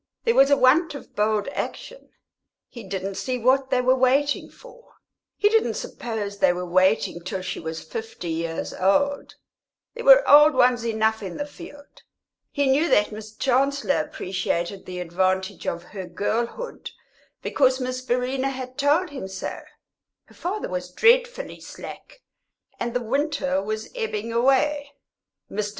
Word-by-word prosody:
There 460 - +3
was 275 -7 +5
a 285 - +5
want 295 +5 +4
of 280 - -11
bold 210 0 +1
action; - - -6 0.6
he 235 - -10
didn't 195 0 -4
see 255 -1 -2
what 260 +3 +2
they 255 -2 +2
were 255 +1 +4
waiting 270 +3 +2
for. - - -17 0.4
He 415 - +3
didn't 445 +1 +2
suppose 205 -4 -5
they - - +5
were 180 0 -4
waiting 185 0 +2
till 185 0 -4
she - - -4
was 160 0 -6
fifty 450 - -6
years 165 0 -3
old; 280 +10 +1 0.6
there 475 - -7
were - - +7
old 295 0 +8
ones 245 -2 +3
enough 220 0 +1
in 190 -4 -6
the 290 - -3
field. 290 0 -13 0.5
He 285 -1 0
knew 280 +5 +3
that 210 +1 +3
Miss 215 0 -8
Chancellor 275 +3 +1
appreciated 190 - -3
the 180 -1 -6
advantage 185 +2 -1
of 170 0 -2
her 190 0 -8
girlhood, 230 - -3 0.5
because 260 -1 +2
Miss 255 0 -3
Verena 255 +2 -1
had 260 0 -7
told 300 +5 +2
him 265 -9 -6
so. 190 0 -5 0.7
Her - - -21
father 385 +5 -4
was 180 0 -4
dreadfully 485 - +2
slack, - - -11 0.6
and 240 0 -3
the 245 - 0
winter 275 -1 0
was 215 +2 -4
ebbing 230 - -3
away. 280 +4 +2 0.6
Mr. 210 0 -2
255 Hz, 150 wpm, -24 LUFS, 200-285 Hz, 0.7 s, old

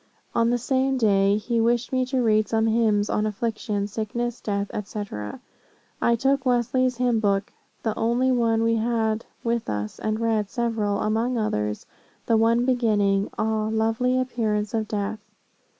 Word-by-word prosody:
On 230 0 +2
the 245 - +2
same 265 +2 0
day, 200 -3 +3
he 230 +2 0
wished 235 +1 +1
me 255 -1 +1
to 260 -1 0
read 215 -2 +3
some 220 0 +2
hymns 220 -2 +2
on 210 0 0
affliction, 215 -1 -2
sickness, 225 +3 -3
death, 200 -1 -2 0.2
&c. 210 0 -4 1.0
I 235 - +3
took 270 +3 +1
Wesley's 250 0 +1
Hymn 245 -2 +2
Book, 200 -2 0 0.3
the 220 -2 -1
only 240 +3 +1
one 230 -2 +2
we 230 0 +2
had 225 -1 0 0.2
with 235 -1 -1
us, 105 0 -4
and 215 0 -1
read 220 -3 0
several, 225 -4 -1
among 230 +3 0
others, 105 - -2 0.4
the 230 - +3
one 230 +2 +3
beginning 210 -6 +2
'Ah, 215 0 0
lovely 225 +3 +1
appearance 220 -4 -1
of 220 -1 -1
death.' 210 +1 -3
225 Hz, 155 wpm, -24 LUFS, 210-240 Hz, 1.0 s, day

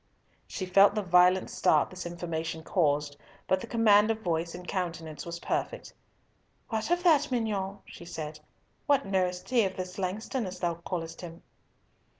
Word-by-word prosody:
She 190 - -4
felt 195 +3 +5
the 210 - 0
violent 180 +1 +4
start - - +2
this 185 -1 -6
information 165 -2 -4
caused, 150 -5 0 0.3
but 190 0 +2
the - - -7
command 215 -2 +5
of 220 0 -1
voice 170 -1 -1
and 180 0 -9
countenance 165 -4 -4
was 170 0 -5
perfect. - - -3 0.8
"What 220 +3 -2
of 350 0 +1
that, 300 -4 +4
mignonne?" 205 -5 -2
she 170 - -12
said. 155 -2 -6 0.5
"What 285 -2 +3
knoweth 185 -2 -1
he 245 -3 +3
of 190 -1 -2
this 185 +1 -5
Langston, 205 +5 -2
as 185 0 -7
thou 175 -1 0
callest 165 -3 -5
him?" 170 -1 -10
185 Hz, 160 wpm, -29 LUFS, 170-210 Hz, 0.8 s, felt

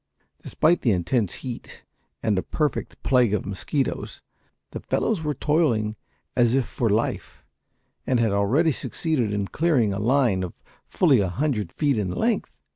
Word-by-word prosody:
Despite 170 +3 +2
the 115 - +3
intense 95 +3 0
heat 125 -2 -8 0.4
and 110 - +2
a 95 - +1
perfect 150 +7 -3
plague 125 -5 +3
of 105 - -3
mosquitoes 105 +8 -3 0.5
the - - -5
fellows 205 -8 -1
were 150 -1 -1
toiling 120 -9 +1 0.4
as 120 -1 +3
if 135 -2 +2
for 115 +1 -1
life, 110 +3 -2 0.6
and 125 - +2
had 115 -3 +2
already 120 +12 +2
succeeded 140 -6 -1
in 100 -1 -2
clearing 140 -11 +2
a 100 - -3
line 120 -4 +2
of 90 -2 -5 0.3
fully 145 -9 +3
a 95 -2 +1
hundred 125 0 -1
feet 140 -6 +1
in 100 -3 -1
length. 90 - -1
120 Hz, 155 wpm, -24 LUFS, 105-145 Hz, 0.6 s, the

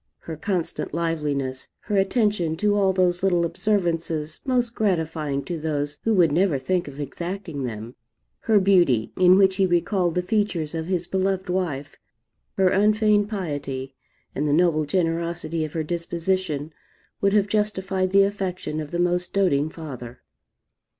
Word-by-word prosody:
Her 160 - -6
constant 175 -3 -2
liveliness, 150 -6 -2
her 210 - -3
attention 195 -4 +1
to 210 +4 +1
all 195 -2 +3
those 180 -1 +1
little 175 -3 +2
observances 165 -5 -1
most 245 -3 0
gratifying 160 -9 -1
to 170 -2 -4
those 145 -2 -2
who 225 -1 +2
would 170 -5 +4
never 170 -1 +2
think 175 +6 -1
of 140 0 -9
exacting 170 -1 -5
them, 115 0 -6 0.5
her 220 -2 +3
beauty, 175 - +3
in 185 0 +6
which 190 -1 +4
he 190 - +3
recalled 175 0 +1
the 180 - +1
features 180 -6 -1
of 160 0 -3
his 180 -2 -1
beloved 190 0 -1
wife, 160 -7 -3 0.6
her 190 -1 +4
unfeigned 210 +1 +3
piety, 145 -9 -4 0.4
and 150 +2 -1
the 145 - +2
noble 160 -2 +3
generosity 165 0 -1
of 155 - -5
her 160 - -1
disposition, 170 -2 -2 0.5
would 200 0 +2
have 205 -2 +4
justified 195 -3 0
the 195 +1 +5
affection 190 -5 -3
of 150 -2 -5
the 170 - -3
most 175 0 0
doting 155 -7 +2
father. 130 -7 -9
175 Hz, 150 wpm, -24 LUFS, 155-195 Hz, 0.6 s, in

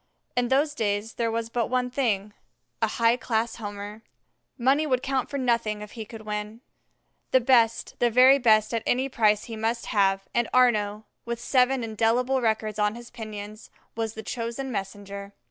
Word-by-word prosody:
In 245 0 +1
those 285 +4 +2
days 210 -3 -1
there 230 -1 -1
was 230 0 -3
but 235 -2 0
one 250 0 0
thing 210 -6 -1 0.5
a - - +3
high 230 0 +2
class 230 -2 -1
Homer. 205 0 -7 0.6
Money 275 +5 +2
would 255 -2 +1
count 265 -1 -1
for 280 - -3
nothing 230 -5 0
if 210 - -11
he 225 -2 -7
could 225 0 -10
win. 210 +2 -5 0.7
The 260 - +5
best, 235 -3 +2
the 240 - +3
very 255 +4 +6
best 215 -3 +4
at 230 - 0
any 260 +2 +1
price 215 -4 +2
he 230 - -7
must 225 +2 -2
have, 195 -2 +1
and 235 -1 +1
Arnaux, 215 -4 +3 0.2
with 235 0 -4
seven 255 +1 +2
indelible 230 +4 +1
records 215 -2 -1
on 210 +1 +1
his 240 0 -11
pinions, 215 -1 -8 0.3
was 225 -1 -3
the 220 - -7
chosen 235 +4 -4
messenger. 200 -1 -6
230 Hz, 175 wpm, -26 LUFS, 210-250 Hz, 0.7 s, very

